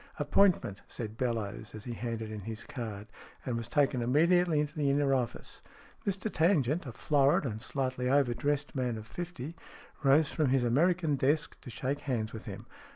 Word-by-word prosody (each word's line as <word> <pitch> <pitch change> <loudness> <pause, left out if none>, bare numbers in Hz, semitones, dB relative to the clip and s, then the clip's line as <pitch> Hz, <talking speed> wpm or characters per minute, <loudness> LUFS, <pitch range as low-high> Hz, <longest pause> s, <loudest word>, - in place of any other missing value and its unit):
" - - -26
Appointment," 175 - +2
said 110 -2 -5
Bellowes, 110 -4 -3
as 110 - -8
he 120 - -5
handed 115 -2 -4
in 110 - -5
his 110 +2 -6
card, 110 -6 -6 0.4
and 125 - -1
was 115 -1 -3
taken 135 0 +2
immediately 165 +6 +3
into 150 0 -1
the 145 -3 +1
inner 140 0 +3
office. 125 -3 -2 0.5
Mr 195 +1 -1
Tangent, 160 -3 +2
a - - -4
florid 140 +3 +3
and 110 -4 -3
slightly 130 -1 -1
overdressed 140 +2 +1
man 125 -4 -1
of 110 - -8
fifty, 165 +1 -6 0.5
rose 140 +2 +4
from 155 -4 +1
his 130 -1 +3
American 155 +5 +2
desk 150 +4 +1
to 125 - -9
shake 130 +5 -2
hands 115 -5 -2
with 110 - -8
him. - - -7
130 Hz, 175 wpm, -31 LUFS, 115-150 Hz, 0.5 s, rose